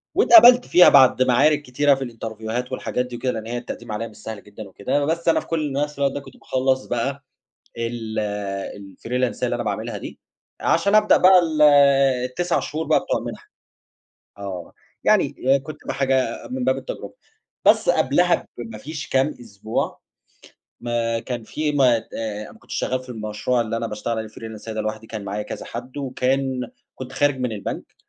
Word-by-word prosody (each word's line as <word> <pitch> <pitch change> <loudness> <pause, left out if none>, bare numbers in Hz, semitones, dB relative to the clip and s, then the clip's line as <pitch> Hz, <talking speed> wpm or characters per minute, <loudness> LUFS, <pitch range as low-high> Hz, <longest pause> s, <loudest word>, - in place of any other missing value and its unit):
واتقبلت 250 -7 +8
فيها 180 - +7
بعد 130 -2 +6
معارك 145 +4 +3
كتيرة 140 +1 +2
في 135 - -4
الإنترفيوهات 115 +1 -5
والحاجات 125 -1 -2
دي 125 -1 -8
وكده 125 +1 -1
لإن 110 0 -6
هي 120 +1 -3
التقديم 120 -1 -7
عليها 105 +2 -3
مش 110 - -16
سهل 110 -2 -8
جدًا 105 0 -10
وكده، 120 +9 -1
بس 165 +3 -2
أنا - - +4
في - - -11
كلّ 155 -4 -1
نفْس 145 +1 -2
الوقت 140 -1 +2
ده - - -3
كنت 135 -2 -14
باخلّص 130 0 0
بقى 135 +4 -3 0.5
ال 115 -1 -4 0.6
الفريلانساية 115 +6 -3
اللي - - -1
أنا - - -4
باعملها - - -3
دي، - - -9 0.4
عشان 200 +1 +2
ابدأ 215 0 +6
بقى 185 0 +7
ال 160 -3 0 0.6
ال9 175 +8 -1
شهور 155 +2 -4
بقى - - +3
بتوع - - -1
المِنحة، - - -8 0.9
آه، 95 -3 -7 0.3
يعني - - +3 0.3
كنت 155 +2 -8
ب - - 0
حاجة 135 -1 0
من 255 0 -3
باب - - +2
التجربة. - - -7 0.5
بس - - +5
قبلها 180 - +2
بما 115 -2 -7
فيش 145 +2 -7
كام 135 +2 +2
أسبوع، 110 -1 -4 0.8
ما 115 -1 -1
كان 120 -1 -5
في 150 +7 -2
ما 130 -5 +4
ت - - -18
أنا 105 -1 -5
ما - - -18
كنتش - - -8
شغال 130 - -1
في 130 0 -14
المشروع 110 +2 -1
اللي 115 0 -2
أنا 115 - -3
باشتغل 110 +2 -3
عليه 110 0 -4
فريلانساية 110 0 -8
ده 110 - -1
لوحدي 110 +1 -5
كان 110 -2 -6
معايا 105 +2 -3
كذا - - -7
حد، 125 +4 -8
وكان 130 -1 -1 0.3
كنت 130 0 -8
خارج 145 -1 +1
من 125 -2 -1
البنك، 105 -3 -6
125 Hz, 180 wpm, -22 LUFS, 110-145 Hz, 0.9 s, واتقبلت